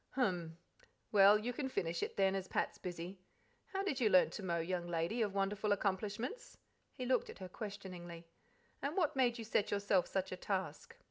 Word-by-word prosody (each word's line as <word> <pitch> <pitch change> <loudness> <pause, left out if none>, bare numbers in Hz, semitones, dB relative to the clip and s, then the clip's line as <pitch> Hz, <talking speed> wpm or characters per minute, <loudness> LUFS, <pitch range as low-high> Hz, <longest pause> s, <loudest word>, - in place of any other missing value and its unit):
"Hum! 175 -10 0 0.5
Well, 205 0 +8
you 235 +4 -3
can 265 +1 -2
finish 170 -8 -1
it - - -3
then, 195 -1 +4
as 190 -1 -2
Pat's - - -1
busy. 180 +1 -6 0.5
How 390 0 -2
did 330 -9 -1
you 225 -4 +4
learn 185 -2 +6
to - - -5
mow, 175 -3 0
young 175 +1 -2
lady 170 +7 0
of 205 -3 0
wonderful 205 +2 0
accomplishments?" 210 - -2 0.3
(he 255 - -5
looked 255 0 +2
at - - -8
her 190 - -7
questioningly); 180 -4 -7 0.6
"and 290 +5 -2
what 330 -7 +2
made 250 -2 +3
you 230 - -5
set 210 -2 +1
yourself 200 -3 +2
such 190 -1 -2
a 185 - -4
task?" 195 - -3
200 Hz, 190 wpm, -36 LUFS, 180-235 Hz, 0.6 s, Well